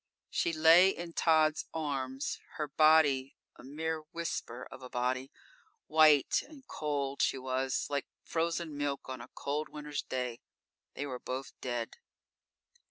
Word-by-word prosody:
She 170 - +1
lay 165 +4 +7
in 170 -3 -5
Tod's 155 -2 +3
arms, 135 -3 -2 0.2
her 150 - -2
body 145 -3 +4 0.2
a - - -14
mere 160 +4 -3
whisper 165 -8 -4
of - - -10
a 125 - -9
body. 130 +2 -1 0.5
White 155 -3 +5
and 285 -4 -14
cold 140 -2 -2
she - - +2
was, 130 0 -1
like 140 -1 -2 0.2
frozen 165 -1 -1
milk 145 -1 -2
on 130 -2 -6
a 120 - -11
cold 150 +2 -2
winter's 150 -1 -4
day. 125 -2 -4 0.5
They 145 - -3
were 130 -3 -5
both 130 +2 -5
dead. 120 -2 -3
145 Hz, 140 wpm, -32 LUFS, 130-160 Hz, 0.5 s, lay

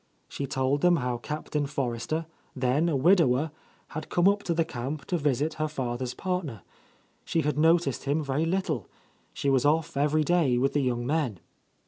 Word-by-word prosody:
She 140 - -5
told 135 +1 0
them 175 -1 +5
how 125 -5 -1
Captain 150 +1 -3
Forrester, 140 +3 -2 0.3
then 135 +6 +1
a 155 - 0
widower, 150 -2 +3 0.4
had 155 - -6
come 175 +1 +3
up 200 +1 +3
to 170 - +1
the 165 0 +2
camp 135 +4 -5
to 180 - -1
visit 145 +1 0
her 155 - +1
father's 125 -4 -3
partner. 175 - -3 0.6
She 165 - 0
had 150 -1 0
noticed 160 -4 +3
him 145 +3 +1
very 145 +3 0
little, 165 - -1 0.2
— - - -38
she 140 - 0
was 130 -2 +3
off 155 +2 +1
every 150 +2 +2
day 155 -7 +2
with 135 +2 +1
the 145 - +2
young 120 -2 -1
men. 140 - -1
145 Hz, 180 wpm, -27 LUFS, 130-160 Hz, 0.6 s, them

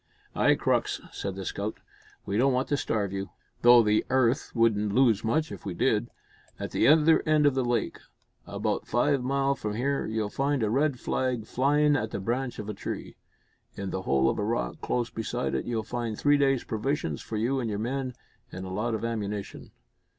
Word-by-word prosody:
"Ay, - - +4
Crux," - - 0
said 100 -1 -4
the 95 -1 -6
scout, 100 +4 -3 0.5
"we 100 - -3
don't 130 +4 +3
want 130 +1 0
to 145 - +2
starve 105 -8 -1
you, 100 0 -4 0.3
though 120 0 +8
the 105 0 +2
'arth 130 +1 +2
wouldn't 105 -3 +2
lose 115 -5 +4
much 150 +8 0
if - - -8
we 95 -3 -5
did. 110 +2 +1 0.5
At - - -5
the - - +2
other 155 +1 +6
end 155 -1 +4
o' 145 - +6
the 130 -1 0
lake, 120 -1 -1 0.5
about - - -2
five 135 +4 +2
mile 135 +2 +1
from 105 -6 -4
here, 140 +4 -1
you'll 110 -1 -2
find 140 -2 0
a 105 - +1
red 140 +1 +1
rag 125 -4 0
flyin' 145 +5 +2
at 110 -6 -1
the - - -4
branch 120 +5 -2
of 105 - -6
a 105 - -3
tree. - - -6 0.6
In 100 -1 -4
the 95 - -3
hole 70 -7 +2
of - - 0
a - - 0
rock 105 - -2
close 120 -2 -1
beside 120 +2 -3
it, - - -1
you'll 115 -2 -2
find 115 -2 -4
three 145 0 +4
days' 135 -2 +2
provisions 110 - -2
for 110 - -5
you 125 +5 0
and 120 -3 -2
your 105 - -2
men, 130 +3 -3 0.4
an' 90 - -7
a 95 0 -6
lot 110 +4 -1
of 110 - -3
ammunition." 105 -3 -4
120 Hz, 200 wpm, -27 LUFS, 105-135 Hz, 0.6 s, though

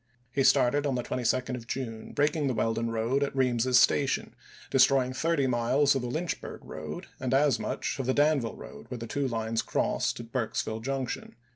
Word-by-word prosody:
He 135 +2 +1
started 145 +3 +4
on 135 - 0
the 125 - -1
22d 125 +1 -1
of 120 -2 -6
June, 115 -4 -5
breaking 150 0 +1
the 130 - 0
Weldon 115 +1 0
road 115 +4 0
at 140 -1 -1
Reams's 125 -1 +3
Station, 130 +2 +2 0.4
destroying 130 -1 +4
thirty 160 0 +1
miles 130 +4 +3
of 135 - -1
the 125 - -3
Lynchburg 160 +8 -4
road - - -7
and 130 0 0
as 145 0 +3
much - - -3
of 130 - -2
the 130 - +2
Danville 145 -5 +2
road, - - -11
where 125 - -5
the 115 - -6
two 140 +4 -1
lines 115 -2 -1
crossed - - -1
at 115 -1 -9
Burkesville 110 -3 -2
Junction. 135 -2 -4
130 Hz, 185 wpm, -28 LUFS, 115-140 Hz, 0.4 s, started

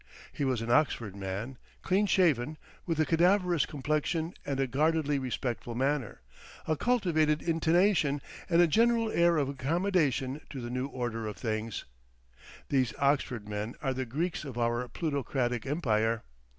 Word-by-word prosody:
He - - -3
was 130 -4 0
an 115 - -2
Oxford 120 -8 +2
man, 100 +6 -5 0.2
clean 195 +3 +2
shaven, 155 -7 +2 0.3
with 165 -2 -1
a 155 - +4
cadaverous 175 0 +3
complexion 155 +4 -1
and 140 -1 -3
a 135 - +3
guardedly 150 +2 +1
respectful 120 -2 -3
manner, 135 -1 -1 0.5
a 155 - +2
cultivated 160 -8 +1
intonation, 165 -2 +2 0.3
and 170 0 +5
a - - +4
general 230 +6 +3
air 170 -1 +4
of 145 -3 +1
accommodation 145 -1 0
to 135 - -6
the 120 -1 -5
new 125 +2 -2
order 120 -4 -3
of 105 - -6
things. 110 -1 -3 0.8
These 130 -4 +1
Oxford 140 -6 0
men 105 +2 -4
are 135 -4 -1
the 130 0 -3
Greeks 160 +9 -2
of 135 -5 -7
our 120 +1 0
plutocratic 130 -4 -2
empire. 115 -7 +1
140 Hz, 150 wpm, -30 LUFS, 120-165 Hz, 0.8 s, and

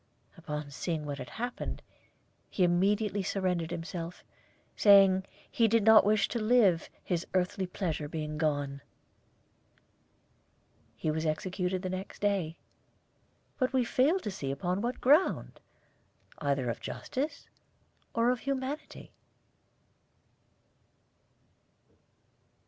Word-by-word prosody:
Upon 150 -4 -6
seeing 155 +1 -3
what 145 -1 -4
had 125 - -7
happened, 245 +2 -5 0.7
he 185 - 0
immediately 200 +4 +2
surrendered 180 -3 -1
himself, 170 0 -6 0.5
saying 195 -2 +6 0.2
he 230 - +3
did 225 0 +3
not 220 +1 +8
wish 205 0 +3
to 235 - -2
live, 215 -7 +3
his 175 -1 -2
earthly 185 +1 0
pleasure 165 -5 -3
being 150 0 -4
gone. 145 -3 -1 2.1
He 155 - -1
was 160 +1 -1
executed 180 +3 -2
the 185 - -2
next 185 +1 -5
day, 195 -6 0 1.0
but 255 0 +1
we 255 -2 +2
fail 275 +9 +3
to - - -8
perceive 140 -8 -4
on 180 +3 0
what 240 +2 -3
ground, 295 +8 +3 0.8
either 140 -3 0
of - - -6
justice 285 +2 -4 0.7
or 230 +1 +3
of 250 - -1
humanity. 275 +2 -4
185 Hz, 110 wpm, -30 LUFS, 160-225 Hz, 2.1 s, not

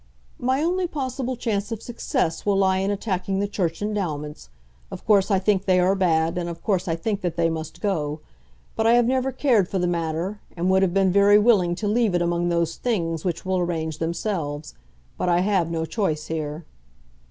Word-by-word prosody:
"My 260 +4 +1
only 360 +2 +1
possible 260 -4 -3
chance 215 -3 -2
of 225 -1 -5
success 175 -8 -2
will 205 -1 +2
lie 190 -1 +3
in 195 +1 0
attacking 195 -2 -2
the 205 - 0
Church 180 -3 -2
endowments. 155 - -4 0.4
Of - - -9
course 200 -2 +4
I 195 - +3
think 195 0 +1
they 185 -1 +3
are 180 +2 +3
bad, 165 -2 +1
and 175 -1 -3
of 170 - -8
course 190 -3 0
I 165 - 0
think 200 +4 -2
that 175 -3 -2
they 165 -1 +1
must 160 -1 -6
go. 155 -7 -1 0.6
But 225 - +1
I 230 - +6
have 240 0 +5
never 260 +2 +1
cared 235 -10 +2
for 195 - -1
the 180 - +1
matter, 170 +3 -2 0.2
and 180 +2 +1
would 190 0 +4
have 190 -1 +1
been 195 -1 +3
very 200 +2 +6
willing 205 -6 +3
to 205 +3 -3
leave 215 -3 +2
it 175 - +2
among 175 0 0
those 170 -1 0
things 165 -9 -1
which 175 -1 -3
will 185 0 0
arrange 160 -3 -2
themselves. 160 -4 -3 0.5
But 180 - 0
I 175 0 +3
have 185 -4 +1
no 165 -1 -2
choice 160 -6 -1
here." 155 0 -4
185 Hz, 205 wpm, -24 LUFS, 165-210 Hz, 0.6 s, I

